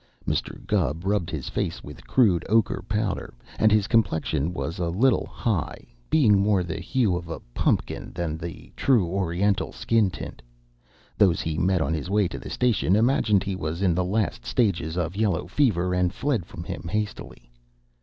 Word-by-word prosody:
Mr. - - -2
Gubb 80 +7 0
rubbed 100 -4 0
his 80 -5 -5
face - - -3
with - - -11
crude 95 -10 +3
ochre 110 +1 +2
powder, 105 - -2 0.2
and 110 - +5
his 105 -2 +4
complexion 80 - +1
was 85 -2 -4
a 85 -1 0
little 115 +9 +2
high, 110 - -2 0.2
being 115 -11 +5
more 100 -2 +2
the 85 -2 -4
hue 115 -9 +1
of 85 -1 -5
a 80 - -5
pumpkin - - -1
than 85 -3 -2
the 85 +1 -8
true 120 -9 +3
Oriental 95 +2 0
skin 115 -4 +1
tint. 85 - -8 0.8
Those 90 -5 +4
he 80 -1 -2
met 90 -1 +2
on 80 +1 0
his 80 +2 -3
way 100 -1 +2
to - - -6
the - - -8
station 120 -6 +2
imagined 110 -4 +3
he 100 -1 -3
was 85 +1 -3
in 90 -3 +3
the 90 +2 +1
last 105 +3 -1
stages 90 - 0
of 90 +1 -2
yellow 100 -5 0
fever, 90 - +1
and 90 -1 +2
fled 115 - -1
from 85 - -8
him 85 - -6
hastily. 105 - -4
95 Hz, 175 wpm, -25 LUFS, 85-105 Hz, 0.8 s, and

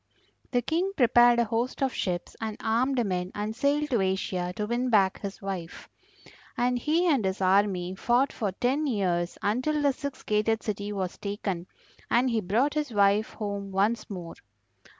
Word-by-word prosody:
The 245 -2 +1
King 350 - 0
prepared 240 -1 +6
a 235 - +4
host 235 +4 -1
of 265 - 0
ships 175 -2 -3
and 220 -1 -3
armed 240 +2 +1
men 180 -1 -2
and 210 +1 -3
sailed 295 +2 +1
to 235 -5 +2
Asia 190 -1 -1
to 210 - -2
win 240 +3 -1
back 195 -5 +3
his 200 -1 -7
wife. 185 -4 -6 0.7
And 245 0 +1
he 320 +7 +1
and 285 -10 +3
his 190 0 -1
army 185 -1 +2
fought 240 +7 +1
for 210 -5 -2
ten 260 +9 0
years 180 -7 0
until 255 +9 +1
the 285 -2 +2
six 280 0 -6
gated 215 +1 +1
city 205 -1 -3
was 190 -3 -4
taken, 200 -3 -4 0.4
and 250 +2 +3
he 225 -1 +1
brought 230 +10 +1
his 300 -3 -2
wife 205 0 +3
home 200 -2 -4
once 210 +4 0
more. 175 -4 -6
215 Hz, 170 wpm, -27 LUFS, 195-250 Hz, 0.7 s, prepared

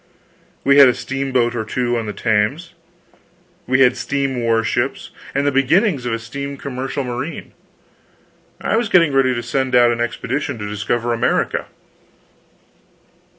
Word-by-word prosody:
We 140 +1 +5
had 140 - +10
a 125 - +2
steamboat 130 -3 -1
or 110 - -2
two 120 +2 -1
on 115 -2 -2
the - - -2
Thames, 115 - -1 0.9
we 130 +1 +2
had 125 -1 +5
steam 135 -3 -2
warships, 115 +3 -1 0.2
and 140 +1 +1
the 145 - +2
beginnings 140 - +2
of 115 - -1
a - - 0
steam 140 +5 -6
commercial 135 +1 -4
marine; 125 +5 -5 1.1
I - - 0
was 230 -2 0
getting 165 -5 +4
ready 130 -1 +3
to 120 - -3
send 130 +2 -1
out 120 -1 +6
an 120 0 -2
expedition 130 +3 -3
to 105 -1 -5
discover 110 +3 -1
America. 115 - 0
130 Hz, 150 wpm, -19 LUFS, 120-140 Hz, 1.1 s, had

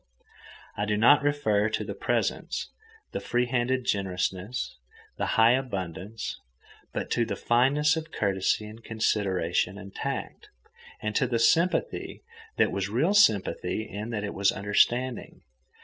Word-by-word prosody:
I 105 - -1
do 105 0 0
not 120 +7 +6
refer 140 -8 +1
to 110 - -2
the - - -5
presents, - - -2 0.4
the - - -3
free 120 +1 0
handed 125 +1 0
generousness, 95 - -2 0.4
the - - -1
high 115 +1 +7
abundance, 105 -4 -3 0.5
but - - -4
to 120 - +2
the 110 -3 -3
fineness 140 +8 +3
of 160 0 -5
courtesy 100 +1 0
and 110 +2 -11
consideration 95 -4 0
and 100 -1 -10
tact, - - -5 0.5
and 105 -1 -2
to 130 - +2
the 120 -1 0
sympathy 170 - +1 0.3
that - - +3
was 95 0 -2
real 135 - +2
sympathy 110 - +2
in 105 +3 -6
that 110 -3 -3
it 100 - -4
was 100 0 +2
understanding. 120 +5 0
110 Hz, 140 wpm, -27 LUFS, 100-125 Hz, 0.5 s, high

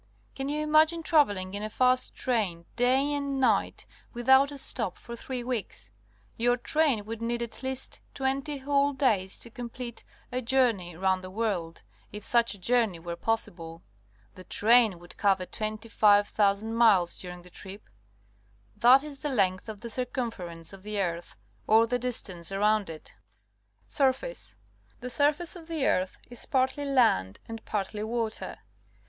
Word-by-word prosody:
Can 270 +1 -4
you 300 +1 -1
imagine 310 +2 +4
travelling 205 - +2
in 205 - -3
a 215 - -3
fast 255 +2 +2
train, 200 -9 -1
day 260 +4 +2
and 280 -1 -2
night, 230 -6 +1 0.3
without 265 +4 +4
a 285 - -7
stop, 230 -7 +1
for 235 - -9
three 250 +1 -5
weeks? 215 - -5 0.5
Your 245 +1 +2
train 270 -5 +1
would 225 +1 -6
need 235 +1 -1
at 235 - -8
least 265 0 -4 0.2
twenty 275 +2 -1
whole 280 +1 +1
days 215 -9 +1
to 235 - -3
com 240 0 -7
plete 240 -1 -8 0.3
a 250 +1 -2
journe^v 230 -9 +1
round 190 -1 +1
the 185 - -7
world, 185 -6 -3 0.3
if 210 0 -8
such 235 -3 +2
a - - -13
journey 225 -2 +1
were 170 +1 -6
possible. 170 -6 -3 0.5
The 185 - -12
train 220 0 +4
would 175 +1 -14
cover 195 -2 +2
25,000 215 -1 +1
miles 205 -7 +4
during 180 -1 -8
the 180 - -16
trip. 195 +3 -9 0.9
That 260 +3 +6
is 290 -2 -8
the 295 - -3
length 195 -5 0
of 210 -2 -8
the 235 - -6
circumference 220 - -4
of 195 - -11
the 210 +1 -4
earth, 170 - -3 0.3
or 220 +1 +6
the 245 +2 -1
distance 195 -8 -3
around 210 0 +1
it. 160 -1 -9 0.7
Surface. 280 - -1 0.2
— - - -35
The 250 +1 -5
surface 295 +6 +1
of 330 -2 -11
the 320 -5 -1
earth 185 +1 0
is 245 - -7
partly 265 +2 0
land 230 - +2
and 225 -1 -8
partty 210 +1 -3
water. 225 0 -3
230 Hz, 160 wpm, -28 LUFS, 195-260 Hz, 0.9 s, That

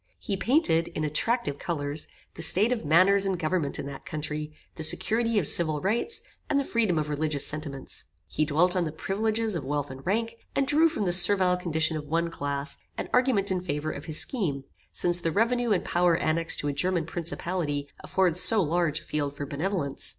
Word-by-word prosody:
He 200 - -4
painted, 190 - +2
in 155 - -5
attractive 155 - 0
colours, 150 -3 -1 0.3
the - - -9
state 200 +8 +6
of 240 - -5
manners 185 +6 +4
and 190 -2 -1
government 160 -3 -2
in - - -5
that 140 -1 -8
country, 150 0 -5 0.2
the - - -9
security 225 +7 +1
of 175 -8 +3
civil 155 -3 +6
rights, 225 - 0 0.3
and 280 - +2
the - - 0
freedom 220 -10 0
of 155 -1 -1
religious 150 -1 0
sentiments. 145 -3 -4 0.2
He 155 - -1
dwelt 165 +5 +1
on 180 -2 0
the 155 - -4
privileges 215 +6 -2
of 165 - -4
wealth 145 0 -3
and 135 +1 -11
rank, 225 +4 -2 0.2
and 275 - +1
drew 310 +4 +3
from 220 -10 -3
the 175 - +1
servile 180 0 +5
condition 160 -3 0
of 150 -1 -8
one 170 +2 -1
class, 140 -2 -3 0.2
an - - -5
argument 250 -7 +2
in 185 -1 -1
favor 155 -3 -3
of 145 - -8
his 155 -1 -1
scheme, 160 - -2 0.3
since 175 0 +4
the 165 - -1
revenue 235 +4 0
and 190 - 0
power 175 -1 +2
annexed 165 0 0
to 145 - -4
a 145 - -1
German 170 +3 0
principality 165 -3 -4 0.2
afford 185 -4 0
so 185 +5 +7
large 165 -3 0
a - - -19
field 145 -2 -3
for 145 - -4
benevolence. 145 0 -2
170 Hz, 200 wpm, -26 LUFS, 150-200 Hz, 0.3 s, so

